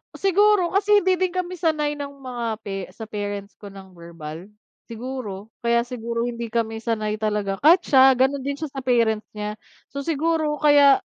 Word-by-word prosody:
Siguro 390 -1 +3
kasi 410 0 +3
hindi 370 -1 +2
din 370 -2 0
kami 365 -1 -3
sanay 305 -3 +1
ng 280 0 -5
mga 245 -2 -5 0.2
pe 195 -2 -5
sa 225 - -8
parents 205 -1 -5
ko 205 - -10
ng 195 -1 -12
verbal, 170 -1 -9 0.4
siguro, 225 -4 -7
kaya 235 0 +2
siguro 235 -1 -4
hindi 235 -1 -4
kami 225 0 -2
sanay 215 -2 -2
talaga 210 -2 -1
kahit 345 +5 +5
siya, 265 -1 +6
ganun 265 +3 +2
din 280 +1 -3
siya 305 0 -6
sa 270 - -5
parent 235 -4 +2 0.2
niya, 210 0 -5 0.3
so, 280 - -5
siguro 315 +1 0
kaya 285 -2 +6
245 Hz, 170 wpm, -23 LUFS, 210-300 Hz, 0.4 s, siya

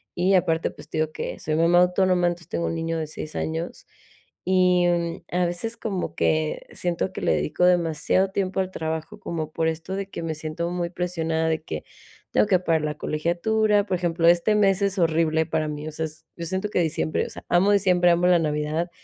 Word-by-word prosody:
y 185 +2 +2
aparte, 165 -2 +2
pues, - - -13
te - - -4
digo 155 0 0
que - - -5
soy 155 0 -2
mamá 170 +2 +5
autónoma, 180 -1 +3
entonces 175 -1 -4
tengo 170 - -2
un - - -2
niño 165 0 -2
de 155 - -3
6 155 0 -7
años, 160 +2 -4 0.6
y, 180 -1 +4
mm, 170 -1 -1
a 180 0 +1
veces 225 +7 -3
como 200 -5 -3
que 155 -1 0
siento 175 +1 -2
que - - -6
le 80 - +2
dedico 75 - -1
demasiado 180 +2 +2
tiempo 190 -1 -1
al 185 0 -4
trabajo, 160 +5 -4
como 160 -5 -4
por 160 +1 0
esto 165 +4 -4
de 195 0 -4
que 170 - -6
me 160 - -2
siento 160 +2 -4
muy 175 -1 -2
presionada 165 -3 -1
de 160 0 0
que - - -5 0.5
tengo - - +3
que 195 -3 +4
pagar 165 -3 +1
la 150 -1 -2
colegiatura. 205 +8 +1
Por 190 -2 -1
ejemplo, 170 -1 +1
este 175 +5 +4
mes 195 -2 +3
es 200 0 0
horrible 160 -1 +2
para 155 -1 -1
mí, 150 +1 -5
o - - -4
sea, 160 +1 -3
es 155 0 -10
yo 170 - -5
siento 190 +4 -2
que - - 0
diciembre, 160 -2 0
o - - -9
sea, - - -10
amo 180 +4 +4
diciembre, 180 -3 +4
amo 170 +1 +2
la 180 -1 +5
Navidad, 155 +2 -1
170 Hz, 215 wpm, -24 LUFS, 160-185 Hz, 0.6 s, mamá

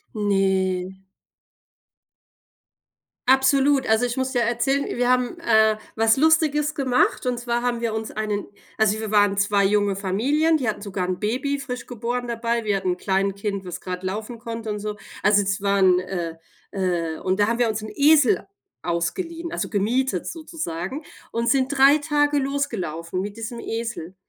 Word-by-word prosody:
Ne. 190 -2 0 2.3
Absolut, 270 +1 +4
also, 220 +2 +3
ich 245 0 -3
muss 260 0 -2
ja 245 - +3
erzählen, 240 +4 +1
wir 245 0 -1
haben, 250 +6 +1
äh, 220 -7 +4 0.2
was 225 0 +4
Lustiges 305 0 +2
gemacht, 255 -3 +1
und 250 -1 -1
zwar 240 0 -2
haben 240 -1 -1
wir 225 -2 -1
uns 220 0 -4
einen 210 -2 -2 0.3
also, 220 0 +2
wir 220 -1 -4
waren 205 -1 +3
2 200 0 +2
junge 205 0 +2
Familien, 265 - +1
die 255 -7 -1
hatten 210 - -4
sogar 190 -3 -3
'n 180 -1 -2
Baby, 265 +7 -1
frisch 250 -2 -6
geboren 245 +1 -3
dabei, 235 0 -1
wir 205 -2 +1
hatten 185 -1 -1
'n 180 - -3
Kleinkind, 195 +1 -1
was 180 0 -6
gerade 180 0 -5
laufen 215 +5 -4
konnte 230 -1 -6
und 210 - -2
so. 210 0 -4 0.3
Also, 205 0 +5
das 200 +1 -1
waren, 195 -2 +4
äh 175 -3 -4 0.3
äh 175 -5 -1
und 185 +1 -1
da 205 - +4
haben 230 +1 0
wir 240 -1 +2
uns 220 -1 -2
'n 215 - -7
Esel 290 -3 +4 0.4
ausgeliehen, 330 - -3
also, - - -3
gemietet 215 0 0
sozusagen 295 - -5 0.3
und 235 0 0
sind 265 -2 +2
3 275 +2 +6
Tage 290 -1 +1
losgelaufen 220 - -2
mit 205 +2 -6
diesem 230 +1 -6
Esel. 225 -7 -5
220 Hz, 165 wpm, -23 LUFS, 195-260 Hz, 2.3 s, 3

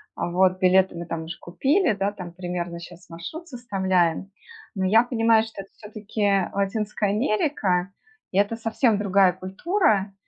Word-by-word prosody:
Вот, 185 +2 +1
билеты 185 0 +3
мы 170 - -6
там 165 -1 -4
уже 170 - -7
купили, 275 - +1
да, 200 0 -1
там 180 -4 -9
примерно 175 -1 -5
щас 175 0 -13
маршрут 310 - -8
составляем. 190 - -1 0.4
Но 190 - -1
я 220 +5 +5
понимаю, 225 -2 +3
что 220 -3 -8
это 195 - -15
всё-таки, 215 0 -7
э, 195 -2 +2
Латинская 205 +1 -1
Америка, 210 - 0 0.4
и 190 - -3
это 205 +3 +1
совсем 225 0 +1
другая 195 -2 +3
культура, 200 - 0
195 Hz, 150 wpm, -24 LUFS, 180-220 Hz, 0.4 s, я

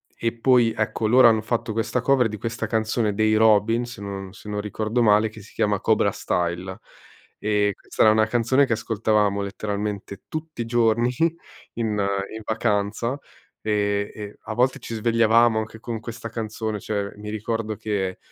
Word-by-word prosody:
e 115 0 -1
poi, 120 -2 +4
ecco, 110 0 0
loro 125 +2 +7
hanno 110 -1 +2
fatto 110 0 -2
questa 115 +3 -1
cover 130 -1 +3
di 105 - -6
questa 115 0 -3
canzone 110 -1 0
dei 110 +1 +2
Robins, 110 +2 +3
se - - -11
non 95 -1 -6
se 100 +2 -14
non 105 0 -2
ricordo 110 +3 -1
male, 110 -1 +4
che 110 0 -12
si 100 - -16
chiama 105 -2 +1
Cobrastyle. 95 -4 0 0.6
E 105 -1 +1
questa - - 0
è - - +8
una 110 0 +3
canzone 125 +4 +2
che 115 - +1
ascoltavamo 105 -2 +1
letteralmente 100 0 -4
tutti 155 -5 -6
i - - -2
giorni 115 +1 +2 0.7
in 110 -3 -1 0.4
in 110 - -6
vacanza, 110 +1 0 0.5
ehm, 100 -1 0
e 105 -1 -8
a 110 - -6
volte 125 +2 +2
ci 115 - -7
svegliavamo 115 0 +4
anche 110 +1 -6
con 115 -1 -5
questa 115 0 -7
canzone, 110 -1 -4
cioè 100 -1 -3
mi 105 0 -7
ricordo 110 0 -3
che, 95 -3 -2
110 Hz, 165 wpm, -24 LUFS, 105-115 Hz, 0.7 s, è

